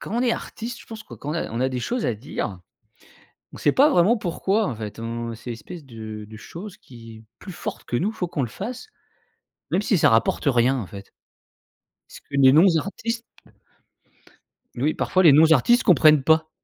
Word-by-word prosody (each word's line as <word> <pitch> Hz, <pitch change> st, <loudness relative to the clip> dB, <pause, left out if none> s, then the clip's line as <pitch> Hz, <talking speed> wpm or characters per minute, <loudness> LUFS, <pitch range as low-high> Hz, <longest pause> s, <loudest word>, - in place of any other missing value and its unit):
quand 210 Hz, -, -6 dB
on 240 Hz, -, +1 dB
est 245 Hz, -2 st, +2 dB
artiste, 235 Hz, +1 st, -6 dB
je -, -, -16 dB
pense 220 Hz, -1 st, -9 dB
que -, -, -11 dB
quand 145 Hz, -, -7 dB
on -, -, -2 dB
a 165 Hz, -, -3 dB
on 115 Hz, +2 st, -4 dB
a 130 Hz, -, +2 dB
des 130 Hz, -1 st, -4 dB
choses 245 Hz, -, -2 dB
à 120 Hz, -, 0 dB
dire, 105 Hz, -4 st, -5 dB, 0.9 s
on -, -, -9 dB
sait 145 Hz, -, +2 dB
pas 285 Hz, +3 st, +5 dB
vraiment 210 Hz, -, +3 dB
pourquoi, 200 Hz, +3 st, -1 dB
en 120 Hz, -, -4 dB
fait. 105 Hz, 0 st, -7 dB
On 115 Hz, 0 st, -5 dB
c'est 115 Hz, -, -10 dB
une -, -, -3 dB
espèce 170 Hz, +8 st, -10 dB
de 110 Hz, -3 st, -8 dB
de 110 Hz, -, -10 dB
chose 180 Hz, -, -10 dB
qui 115 Hz, -3 st, -13 dB
est 110 Hz, -, -16 dB, 0.2 s
plus 190 Hz, -, -9 dB
forte -, -, -6 dB
que 120 Hz, -, -2 dB
nous, 200 Hz, -, 0 dB
faut 195 Hz, -5 st, -4 dB
qu'on 150 Hz, -5 st, -2 dB
le 120 Hz, -, -4 dB
fasse, 235 Hz, -, -7 dB, 0.8 s
même 195 Hz, -, +1 dB
si 205 Hz, -2 st, +1 dB
ça -, -, +4 dB
rapporte 115 Hz, 0 st, +1 dB
rien, 130 Hz, 0 st, +3 dB
en 105 Hz, -, -5 dB
fait. 100 Hz, +1 st, -12 dB, 1.0 s
Ce -, -, -13 dB
que -, -, -41 dB
les 135 Hz, -1 st, +6 dB
non-artistes 195 Hz, +8 st, +2 dB, 1.6 s
Oui, 145 Hz, +6 st, +1 dB
parfois 185 Hz, -, +1 dB
les 155 Hz, -5 st, +8 dB
non-artistes 160 Hz, -, +5 dB
comprennent 155 Hz, -, +5 dB
pas. 160 Hz, +2 st, +3 dB
150 Hz, 205 wpm, -23 LUFS, -, 1.6 s, les